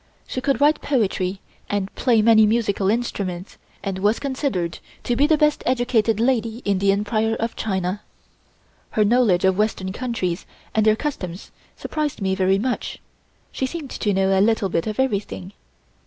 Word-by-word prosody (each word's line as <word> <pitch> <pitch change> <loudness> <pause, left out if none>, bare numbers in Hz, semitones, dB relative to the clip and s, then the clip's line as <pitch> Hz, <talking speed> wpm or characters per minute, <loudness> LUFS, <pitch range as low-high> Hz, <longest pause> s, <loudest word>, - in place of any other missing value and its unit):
She 255 - -4
could 275 +1 +1
write 295 +2 +4
poetry 195 -7 0 0.3
and 200 -1 -2
play 235 -4 +2
many 220 -1 +6
musical 210 -3 +1
instruments, 200 -5 -3 0.2
and 195 -2 -3
was 210 +3 +2
considered 260 - -2 0.2
to 240 - 0
be 285 +4 +3
the 315 -1 +4
best 300 -1 +2
educated 235 -4 +2
lady 235 -1 0
in 200 -2 +1
the 195 0 +3
Empire 215 +2 0
of 230 +1 -2
China. 190 -1 -2 1.0
Her 215 - +5
knowledge 205 -5 +3
of 190 +1 +2
western 205 -3 0
countries 205 -8 -3 0.3
and 220 0 +2
their 215 - +5
customs 205 - -5 0.3
surprised 305 -2 -3
me 190 -2 0
very 190 0 +2
much; 245 +4 -2 0.5
she 265 - -2
seemed 295 -1 -7
to 210 - -1
know 190 0 +2
a 190 - +4
little 215 -2 +2
bit 165 +1 -1
of 215 +2 -4
everything. 200 -6 -2
215 Hz, 165 wpm, -22 LUFS, 190-245 Hz, 1.0 s, many